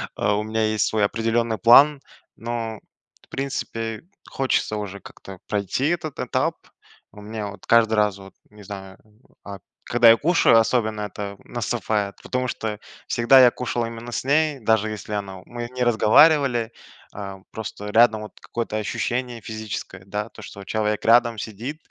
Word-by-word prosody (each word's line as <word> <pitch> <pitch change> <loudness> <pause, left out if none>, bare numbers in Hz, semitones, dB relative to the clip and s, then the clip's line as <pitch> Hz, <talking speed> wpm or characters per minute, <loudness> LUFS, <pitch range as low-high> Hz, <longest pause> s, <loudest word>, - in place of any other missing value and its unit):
а, 100 +1 +1
у 105 - -1
меня 110 0 -1
есть 110 -1 +1
свой 110 -2 +1
определенный 115 +1 0
план, 135 +7 +6 0.3
но, 115 -2 -4 0.5
в - - -46
принципе 115 -4 -4 0.3
хочется 130 -5 0
уже 100 -1 -6
как-то 95 -1 -12
пройти 105 +7 -1
этот 160 -4 -3
этап. - - 0 0.6
У 105 - -12
меня, 105 0 -5
вот, 100 0 -11
каждый 115 -1 +4
раз, 105 -2 +2
вот, 95 0 -13 0.2
не 105 0 -15
знаю, 95 -1 -9
э, 110 - -27 0.4
а 100 -1 -8 0.3
Когда 120 -1 +5
я 115 - +8
кушаю, 165 -6 +4
особенно 110 -2 0
это 100 -1 -5
наступает, 110 -4 -2
потому 125 0 -2
что 110 -3 -4 0.3
всегда 120 +3 +5
я 125 -1 +7
кушал 120 -1 -2
именно 115 +1 -8
с - - -2
ней, 150 +1 +2
даже 110 -1 +1
если 105 0 -6
она 95 -2 -5
мы 120 -1 -6
не 125 - +1
разговаривали, 120 +1 +4 0.4
а 100 -1 -7
просто 105 -1 -6
рядом, 110 -1 +4
вот, 105 - -8
какое-то 115 -2 -4
ощущение 120 +2 -3
физическое, 110 -3 -7
да, 105 +3 -4
то, 115 - -14
что, 100 -1 -10
вот, 95 - -13
человек 105 0 -1
рядом 115 0 +4
сидит, 115 +8 -6
110 Hz, 165 wpm, -23 LUFS, 105-120 Hz, 0.6 s, я